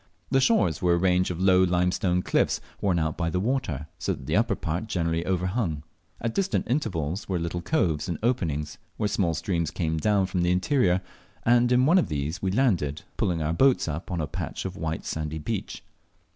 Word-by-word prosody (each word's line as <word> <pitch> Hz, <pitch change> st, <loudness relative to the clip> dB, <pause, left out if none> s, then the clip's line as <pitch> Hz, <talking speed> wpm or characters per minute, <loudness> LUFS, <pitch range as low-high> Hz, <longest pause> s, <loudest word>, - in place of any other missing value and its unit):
The 135 Hz, 0 st, +4 dB
shores 220 Hz, -, +2 dB
were 90 Hz, -2 st, +3 dB
a -, -, +1 dB
range 90 Hz, 0 st, +2 dB
of 90 Hz, -1 st, -4 dB
low 95 Hz, -1 st, +5 dB
limestone 90 Hz, 0 st, +1 dB
cliffs, -, -, +1 dB, 0.2 s
worn 95 Hz, -4 st, +2 dB
out 80 Hz, -1 st, 0 dB
by 85 Hz, -1 st, -1 dB
the 90 Hz, -, -1 dB
water, 95 Hz, -, -1 dB
so -, -, 0 dB
that 65 Hz, -, -9 dB
the -, -, -1 dB
upper -, -, +2 dB
part 85 Hz, +7 st, -3 dB
generally 85 Hz, -4 st, -1 dB
overhung. 90 Hz, -3 st, -1 dB, 0.4 s
At 115 Hz, -1 st, -2 dB
distant 195 Hz, -1 st, 0 dB
intervals 100 Hz, -, -2 dB
were 95 Hz, -, +1 dB
little 85 Hz, +1 st, -3 dB
coves 85 Hz, -1 st, 0 dB
and 85 Hz, -, -2 dB
openings, 85 Hz, -, -1 dB, 0.2 s
where 105 Hz, -, +1 dB
small 85 Hz, -5 st, 0 dB
streams 85 Hz, -2 st, -1 dB
came 80 Hz, -1 st, -2 dB
down 100 Hz, +2 st, +2 dB
from 90 Hz, -1 st, -1 dB
the 85 Hz, -, +2 dB
interior; 95 Hz, -1 st, +2 dB, 0.4 s
and 120 Hz, +1 st, +4 dB
in 125 Hz, +1 st, +4 dB
one 175 Hz, +6 st, +5 dB
of -, -, 0 dB
these 75 Hz, +3 st, -3 dB
we 95 Hz, -, 0 dB
landed, 95 Hz, -, +1 dB
pulling 85 Hz, -3 st, 0 dB
our 75 Hz, +2 st, 0 dB
boat 130 Hz, +5 st, +3 dB
up 80 Hz, +2 st, -4 dB
on 90 Hz, -2 st, -2 dB
a 80 Hz, -, 0 dB
patch -, -, -5 dB
of 95 Hz, -1 st, -4 dB
white 80 Hz, -3 st, -4 dB
sandy 80 Hz, 0 st, -3 dB
beach. 75 Hz, -, -4 dB
90 Hz, 200 wpm, -26 LUFS, 80-105 Hz, 0.4 s, low